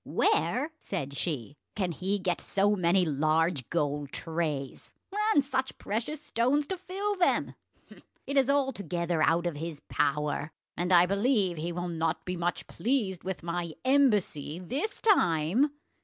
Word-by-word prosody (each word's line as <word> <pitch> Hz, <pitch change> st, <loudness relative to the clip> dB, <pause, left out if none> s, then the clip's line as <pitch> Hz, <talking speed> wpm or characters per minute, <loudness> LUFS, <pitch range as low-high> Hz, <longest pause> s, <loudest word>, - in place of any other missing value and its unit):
"Where," 290 Hz, +6 st, +1 dB
said 140 Hz, -8 st, -4 dB
she, 145 Hz, -3 st, -3 dB, 0.2 s
"can 185 Hz, -4 st, 0 dB
he 190 Hz, +4 st, -1 dB
get 180 Hz, -3 st, -1 dB
so 205 Hz, +1 st, +2 dB
many 180 Hz, 0 st, +3 dB
large 155 Hz, -1 st, +1 dB
gold 145 Hz, -3 st, -1 dB
trays, 155 Hz, -5 st, -4 dB, 0.4 s
and 285 Hz, -, +4 dB
such 265 Hz, -1 st, -2 dB
precious 235 Hz, +9 st, -3 dB
stones 285 Hz, 0 st, +1 dB
to 380 Hz, -, -2 dB
fill 395 Hz, +3 st, -2 dB
them? 360 Hz, -, +2 dB, 0.7 s
It 280 Hz, -, -3 dB
is 270 Hz, -1 st, +4 dB
altogether 190 Hz, -, 0 dB
out 165 Hz, +2 st, +3 dB
of 170 Hz, -4 st, -2 dB
his 160 Hz, -1 st, -5 dB
power, 150 Hz, +1 st, 0 dB, 0.2 s
and 175 Hz, +1 st, -1 dB
I 175 Hz, -1 st, +7 dB
believe 200 Hz, -2 st, +1 dB
he 165 Hz, +3 st, -3 dB
will 175 Hz, +1 st, -3 dB
not 165 Hz, -1 st, -2 dB
be 180 Hz, -, -2 dB
much 175 Hz, 0 st, -2 dB
pleased 220 Hz, -8 st, -1 dB
with 190 Hz, -2 st, -4 dB
my 170 Hz, -1 st, -3 dB
embassy 210 Hz, -, +2 dB
this 275 Hz, -, -3 dB
time." 200 Hz, -, +3 dB
180 Hz, 145 wpm, -29 LUFS, 160-255 Hz, 0.7 s, I